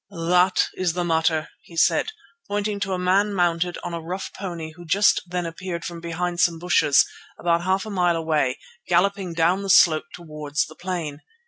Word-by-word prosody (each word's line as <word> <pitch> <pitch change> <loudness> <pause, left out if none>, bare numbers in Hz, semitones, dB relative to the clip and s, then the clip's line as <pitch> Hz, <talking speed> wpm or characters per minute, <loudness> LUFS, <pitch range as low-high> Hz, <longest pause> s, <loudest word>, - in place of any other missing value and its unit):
"That 180 +1 +4
is 180 -3 -1
the 175 0 -1
matter," 160 -2 +1
he 165 - -14
said, - - +3 0.4
pointing 205 0 -2
to 200 -1 -2
a - - -1
man 195 +3 +2
mounted 175 -1 +1
on - - -5
a 170 - -4
rough 180 +4 -5
pony 170 -5 -6
who 175 +2 -13
just 195 +5 +3
then 180 0 -3
appeared 170 +1 -5
from 170 -1 -6
behind 175 +1 -3
some 170 -1 +3
bushes 160 -4 +4 0.3
about 170 -1 +1
half 190 +2 0
a 215 - -6
mile 180 -3 +2
away, 155 -5 0 0.3
galloping 185 0 +1
down 170 +4 +2
the 195 - -5
slope 160 -4 +5
towards 150 -4 -3
the 155 - -12
plain. 170 -5 -5
175 Hz, 185 wpm, -23 LUFS, 165-185 Hz, 0.4 s, slope